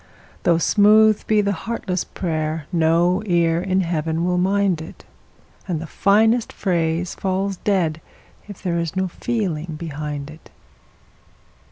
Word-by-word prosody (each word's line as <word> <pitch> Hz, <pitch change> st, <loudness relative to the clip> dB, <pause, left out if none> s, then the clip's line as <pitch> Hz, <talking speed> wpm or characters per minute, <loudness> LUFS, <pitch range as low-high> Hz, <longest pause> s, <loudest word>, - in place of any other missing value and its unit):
Though 170 Hz, -1 st, +3 dB
smooth 215 Hz, +4 st, +4 dB
be 215 Hz, -1 st, +3 dB
the 200 Hz, 0 st, 0 dB
heartless 190 Hz, -2 st, -3 dB
prayer, 155 Hz, -3 st, -3 dB
no 170 Hz, +2 st, +2 dB
ear 170 Hz, -2 st, +2 dB
in 190 Hz, +1 st, +1 dB
Heaven 165 Hz, -1 st, -1 dB
will 180 Hz, 0 st, +1 dB
mind 190 Hz, -2 st, +1 dB
it, 160 Hz, -, -11 dB, 0.6 s
And 175 Hz, -4 st, -2 dB
the 165 Hz, -, -6 dB
finest 220 Hz, +7 st, +2 dB
phrase 170 Hz, -2 st, -1 dB
falls 190 Hz, 0 st, -2 dB
dead 170 Hz, -6 st, 0 dB, 0.5 s
if 205 Hz, -3 st, -11 dB
there 170 Hz, -2 st, 0 dB
is 170 Hz, +1 st, -3 dB
no 190 Hz, 0 st, 0 dB
feeling 175 Hz, -7 st, -3 dB
behind 150 Hz, -2 st, -5 dB
it. 155 Hz, -, -15 dB
175 Hz, 135 wpm, -21 LUFS, 160-200 Hz, 0.6 s, smooth